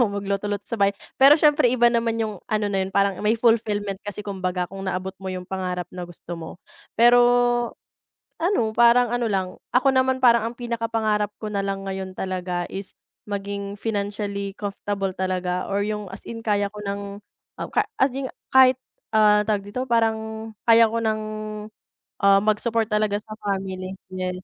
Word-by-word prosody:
akong 205 Hz, -4 st, +2 dB
magluto-luto 200 Hz, 0 st, -2 dB
sa 230 Hz, -, -4 dB
bahay, 200 Hz, 0 st, +3 dB, 0.2 s
pero 280 Hz, +3 st, +9 dB
siyempre 295 Hz, -5 st, +4 dB
iba 240 Hz, -1 st, +4 dB
naman 230 Hz, -1 st, +1 dB
yung 215 Hz, -4 st, -3 dB
ano 215 Hz, -1 st, 0 dB
na 195 Hz, -, +1 dB
yun 190 Hz, -, -1 dB
parang 200 Hz, -1 st, +2 dB
may 215 Hz, +2 st, +2 dB
fulfillment 210 Hz, -4 st, +1 dB
kasi, 205 Hz, 0 st, -6 dB
kumbaga 185 Hz, -2 st, -2 dB
kung 195 Hz, 0 st, -8 dB
naabot 185 Hz, +1 st, -3 dB
mo 190 Hz, -, -5 dB
yung 185 Hz, -1 st, -5 dB
pangarap 180 Hz, -2 st, -4 dB
na 180 Hz, -1 st, -6 dB
gusto 175 Hz, 0 st, -8 dB
mo. 160 Hz, -, -7 dB, 0.5 s
Pero 240 Hz, +1 st, +7 dB, 1.2 s
ano 345 Hz, -, +2 dB
parang 240 Hz, +1 st, +6 dB
ano 240 Hz, 0 st, 0 dB
lang, 185 Hz, -1 st, -1 dB, 0.2 s
ako 260 Hz, +2 st, +4 dB
naman 260 Hz, 0 st, +2 dB
parang 235 Hz, -3 st, +5 dB
ang 240 Hz, -, -15 dB
pinaka-pangarap 225 Hz, -3 st, -1 dB
ko 215 Hz, -, -5 dB
nalang 195 Hz, -1 st, -3 dB
ngayon 190 Hz, -1 st, -4 dB
talaga, 180 Hz, -2 st, -3 dB
is 195 Hz, 0 st, -6 dB, 0.4 s
maging 200 Hz, 0 st, -4 dB
financially 200 Hz, -2 st, -3 dB
comfortable 200 Hz, -1 st, -3 dB
talaga 185 Hz, -1 st, -2 dB
or 200 Hz, +1 st, 0 dB
yung 210 Hz, -1 st, -3 dB
as 195 Hz, -, -9 dB
in 230 Hz, -1 st, -7 dB
kaya 205 Hz, -2 st, 0 dB
ko 210 Hz, -, -10 dB
ng 200 Hz, 0 st, -5 dB, 0.4 s
ah, -, -, -3 dB
ka -, -, +1 dB, 0.2 s
as 265 Hz, -, +5 dB
in 270 Hz, -1 st, -3 dB, 0.2 s
kahit, 260 Hz, -1 st, +7 dB, 0.3 s
ah, 210 Hz, -1 st, +5 dB
tawag 205 Hz, -1 st, -1 dB
dito 250 Hz, +5 st, -3 dB
parang 230 Hz, -3 st, +2 dB, 0.5 s
kaya 230 Hz, -1 st, +6 dB
ko 230 Hz, +1 st, -2 dB
ng, 215 Hz, 0 st, 0 dB, 1.0 s
ah, 195 Hz, -1 st, +5 dB
mag-support 225 Hz, +1 st, +1 dB
talaga 210 Hz, -1 st, +1 dB
sa 210 Hz, +1 st, -6 dB
family 190 Hz, -1 st, -3 dB, 0.2 s
yes, 185 Hz, 0 st, -4 dB
205 Hz, 170 wpm, -23 LUFS, 195-230 Hz, 1.2 s, pero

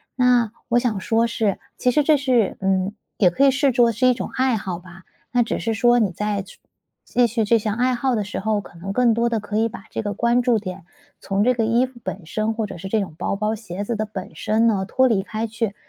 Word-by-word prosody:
那 245 Hz, -3 st, +3 dB, 0.2 s
我 240 Hz, 0 st, +4 dB
想 235 Hz, -4 st, -1 dB
说 225 Hz, +3 st, +2 dB
是 220 Hz, -4 st, -1 dB, 0.2 s
其 250 Hz, -, +2 dB
实 295 Hz, +4 st, +3 dB
这 310 Hz, -, +5 dB
是 255 Hz, -7 st, +1 dB
嗯， 190 Hz, +1 st, 0 dB, 0.2 s
也 185 Hz, -, +5 dB
可 265 Hz, +11 st, +2 dB
以 275 Hz, -, +6 dB
视 275 Hz, -1 st, +2 dB
作 235 Hz, -1 st, +4 dB
是 240 Hz, +4 st, +2 dB
一 250 Hz, -, +5 dB
种 240 Hz, -, -5 dB
爱 260 Hz, -2 st, +2 dB
好 190 Hz, -5 st, -4 dB
吧。 185 Hz, +1 st, -14 dB, 0.3 s
那 245 Hz, -1 st, +4 dB
只 230 Hz, -, -3 dB
是 225 Hz, -, -1 dB
说 240 Hz, +2 st, +4 dB
你 210 Hz, -4 st, +2 dB
在 205 Hz, +2 st, -2 dB
去 195 Hz, +1 st, -14 dB, 0.5 s
继 245 Hz, -1 st, +2 dB
续 230 Hz, 0 st, 0 dB
这 225 Hz, +2 st, +3 dB
项 210 Hz, -1 st, -2 dB
爱 250 Hz, +2 st, +1 dB
好 250 Hz, +1 st, 0 dB
的 210 Hz, -, 0 dB
时 205 Hz, -, -5 dB
候， 210 Hz, 0 st, 0 dB
可 175 Hz, -, -15 dB
能 195 Hz, +4 st, -5 dB
更 240 Hz, +1 st, +3 dB
多 235 Hz, +1 st, +1 dB
的 230 Hz, -2 st, 0 dB
可 210 Hz, +1 st, -3 dB
以 225 Hz, +1 st, +3 dB
把 210 Hz, -, -10 dB
这 -, -, -3 dB
个 205 Hz, -2 st, -3 dB
关 235 Hz, +4 st, +2 dB
注 245 Hz, -2 st, +2 dB
点 185 Hz, -5 st, -7 dB, 0.3 s
从 195 Hz, +1 st, 0 dB
这 250 Hz, +3 st, +4 dB
个 230 Hz, -2 st, 0 dB
衣 235 Hz, +3 st, +3 dB
服 250 Hz, -2 st, -14 dB
本 185 Hz, -1 st, -6 dB
身， 215 Hz, +6 st, -1 dB
或 220 Hz, -1 st, -2 dB
者 200 Hz, -, -8 dB
是 190 Hz, +3 st, -7 dB
这 215 Hz, +2 st, +1 dB
种 190 Hz, -5 st, -5 dB
包 200 Hz, -, -2 dB
包 215 Hz, +1 st, -1 dB
鞋 205 Hz, -3 st, -6 dB
子 235 Hz, +3 st, -2 dB
的 215 Hz, -, -1 dB
本 205 Hz, -2 st, -7 dB
身 220 Hz, +2 st, +1 dB
呢 195 Hz, -4 st, +1 dB
脱 260 Hz, +5 st, +3 dB
离 205 Hz, -4 st, +2 dB
开 215 Hz, +3 st, -4 dB
去， 225 Hz, -2 st, -3 dB
220 Hz, 280 characters per minute, -22 LUFS, 200-240 Hz, 0.5 s, 以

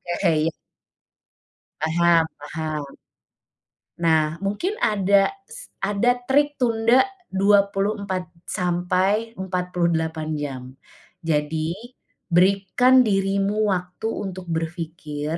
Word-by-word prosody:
Oke 165 Hz, -5 st, +2 dB
ya. 165 Hz, -, -2 dB, 1.3 s
Paham 165 Hz, +1 st, +3 dB, 0.3 s
paham. 155 Hz, -2 st, -3 dB, 1.2 s
Nah 160 Hz, 0 st, +2 dB
mungkin 205 Hz, -, -1 dB
ada 200 Hz, -1 st, +3 dB, 0.2 s
s -, -, -11 dB
ada 205 Hz, +5 st, +1 dB
trik 290 Hz, +2 st, +2 dB
tunda 235 Hz, -, +3 dB, 0.2 s
24 200 Hz, -1 st, +1 dB, 0.2 s
sampai 185 Hz, +5 st, 0 dB
48 170 Hz, -4 st, -1 dB
jam, 145 Hz, -4 st, -4 dB, 0.6 s
jadi 160 Hz, 0 st, -1 dB, 0.6 s
berikan 200 Hz, +8 st, +4 dB
dirimu 200 Hz, +1 st, +1 dB
waktu 180 Hz, +3 st, -2 dB
untuk 185 Hz, -4 st, -5 dB
berpikir, 160 Hz, -2 st, -4 dB
185 Hz, 80 wpm, -23 LUFS, 165-205 Hz, 1.3 s, berikan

